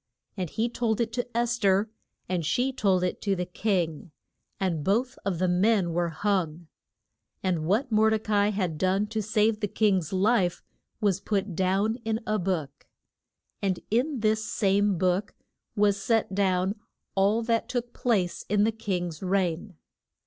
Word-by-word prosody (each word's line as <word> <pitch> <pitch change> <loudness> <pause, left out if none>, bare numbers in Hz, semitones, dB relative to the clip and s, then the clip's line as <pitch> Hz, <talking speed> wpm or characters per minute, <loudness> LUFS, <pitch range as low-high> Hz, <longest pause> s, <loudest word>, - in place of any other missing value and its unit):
And 185 -4 -3
he 225 +7 0
told 235 -2 -1
it 230 -1 -1
to 245 -1 -3
Es 240 0 +1
ther, 200 +1 +3 0.4
and 180 -2 -1
she 250 - 0
told 190 -6 +2
it 180 - -2
to 200 -2 +1
the 180 -1 -2
king, 180 -3 -1 0.5
and 170 -6 -1
both 240 - +1
of 190 -3 -1
the 185 +2 +1
men 180 0 +2
were 170 0 0
hung. 170 -2 -1 0.8
And 175 -5 0
what 230 +8 +1
Mor 220 0 +4
de 220 - +2
ca 215 0 -4
i 205 0 +4
had 185 -7 -2
done 190 +2 +2
to 215 +1 -3
save 215 +1 +1
the 210 - -1
king's 190 -6 +1
life 190 -2 +2 0.4
was 200 -3 +2
put 195 -3 -1
down 195 +5 +1
in 220 0 -1
a 215 0 0
book. 165 -6 -3 0.7
And 190 -2 0
in 255 +3 +1
this 215 0 +2
same 200 -2 +1
book 185 +3 0 0.4
was 205 -1 +2
set 225 -2 +1
down 190 +1 +1 0.3
all 200 +4 +2
that 230 0 0
took 245 -1 -3
place 200 -8 0
in 205 0 +3
the 220 - +3
king's 180 -7 -3
reign. 185 0 -1
200 Hz, 165 wpm, -27 LUFS, 180-220 Hz, 0.8 s, Mor